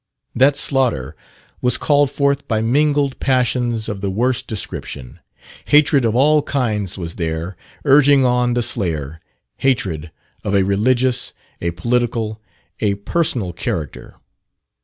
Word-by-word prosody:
That 135 +3 +3
slaughter 130 - 0 0.5
was 125 0 +3
called 145 -1 +2
forth 140 0 0
by 110 -2 0
mingled 140 +4 +1
passions 125 -3 0
of 100 -2 -5
the 100 - -1
worst 125 +6 0
description. 80 - -6 0.5
Hatred 145 -3 +4
of 115 0 0
all 150 +4 +4
kinds 110 -10 -2
was 85 -3 -6
there 85 +1 -3 0.3
urging 140 -1 +5
on 125 -1 +1
the 120 - +1
slayer 80 - -2 0.4
hatred 95 - -1 0.3
of 100 -1 -1
a 100 - +4
religious, 120 +6 +1 0.3
a 85 - -1
political, 110 +4 -1 0.4
a 100 -2 +1
personal 105 - -1
character. 80 -4 -5
120 Hz, 125 wpm, -19 LUFS, 100-135 Hz, 0.5 s, urging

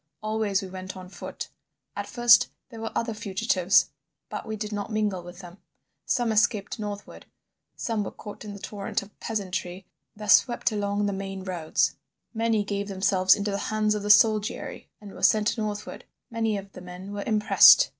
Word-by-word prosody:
Always 215 -2 0
we - - -5
went 185 +1 -7
on 185 -1 -10
foot. - - -7 0.5
At - - -4
first 240 -1 +6 0.2
there 225 -3 -9
were 225 - -4
other 230 -1 -1
fugitives, 195 -3 +2 0.4
but 210 - -6
we 220 - -3
did 210 0 -5
not 205 +1 -4
mingle 210 -4 0
with 175 +1 -11
them. 175 +1 -12 0.5
Some 240 -3 +1
escaped 215 -1 +1
northward, 205 -1 -7 0.5
some 225 -3 -2
were - - -4
caught 210 - -10
in 210 -1 -7
the 200 - -9
torrent 200 0 -3
of 205 - -18
peasantry 190 -3 -4 0.3
that 210 -1 -1
swept 245 +2 +4
along 205 -1 -1
the 200 - 0
main 195 0 -5
roads; 175 -4 0 0.4
many 225 -2 +1
gave 200 0 -3
themselves 190 -1 +3
into 205 0 -2
the 200 - -2
hands 215 -1 +1
of 210 - -2
the 205 - -4
soldiery 215 0 +3
and 205 -2 -11
were - - -11
sent 215 +1 +4
northward. 210 -1 -5 0.3
Many 225 -2 0
of 195 0 -8
the - - -11
men 180 +2 -9
were 205 0 -4
impressed. 215 -2 +7
205 Hz, 180 wpm, -26 LUFS, 195-215 Hz, 0.5 s, impressed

